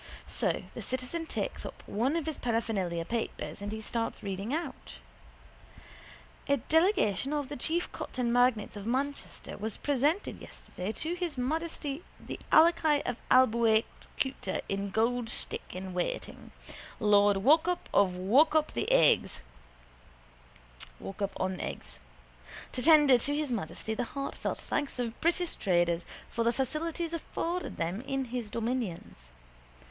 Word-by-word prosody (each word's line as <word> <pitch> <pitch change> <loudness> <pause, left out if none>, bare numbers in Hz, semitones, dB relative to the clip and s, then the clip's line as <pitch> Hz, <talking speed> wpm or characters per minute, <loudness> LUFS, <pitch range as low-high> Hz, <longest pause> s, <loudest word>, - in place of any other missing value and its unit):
So - - 0
the - - -6
citizen 260 +6 -2
takes - - -3
up - - -8
one 250 +9 0
of 335 - -1
his 315 -2 -3
paraphernalia 200 -8 -1
papers 230 -1 -4
and 205 0 -4
he 220 0 -4
starts 230 +1 -3
reading 200 +3 -3
out: 325 +4 -4 1.5
—A 280 - +4
delegation 300 - +2
of 290 -3 -2
the 290 - -4
chief 330 +7 0
cotton 240 -2 -2
magnates 245 -4 +3
of 205 +1 -6
Manchester 275 0 -3
was 215 0 -3
presented 290 +7 0
yesterday 185 +4 -6
to 320 +7 -2
His 350 -5 -3
Majesty 305 +2 -2 0.2
the - - -7
Alaki 315 -2 +5
of 245 - -2
Abeakuta 235 -1 +2
by 195 - 0
Gold 230 +3 0
Stick - - -2
in 185 0 -5
Waiting, 180 -1 -3 0.5
Lord 205 -1 +5
Walkup 315 - +3
of 195 -2 +4
Walkup 290 - +4 2.7
on 185 -1 -1
Eggs, - - -6 0.7
to 250 - 0
tender 295 -4 +7
to 285 +4 +1
His 295 -3 -1
Majesty 205 0 -2
the 245 +2 -1
heartfelt 275 +3 -4
thanks 290 -2 -2
of 240 -2 -3
British 345 +1 +1
traders 175 -2 +1 0.2
for 230 - -1
the 235 - +3
facilities 315 +6 -2
afforded 335 +2 -3
them 175 +6 -2
in 270 0 -2
his 240 -3 -4
dominions. 225 - -3
250 Hz, 130 wpm, -30 LUFS, 210-300 Hz, 2.7 s, tender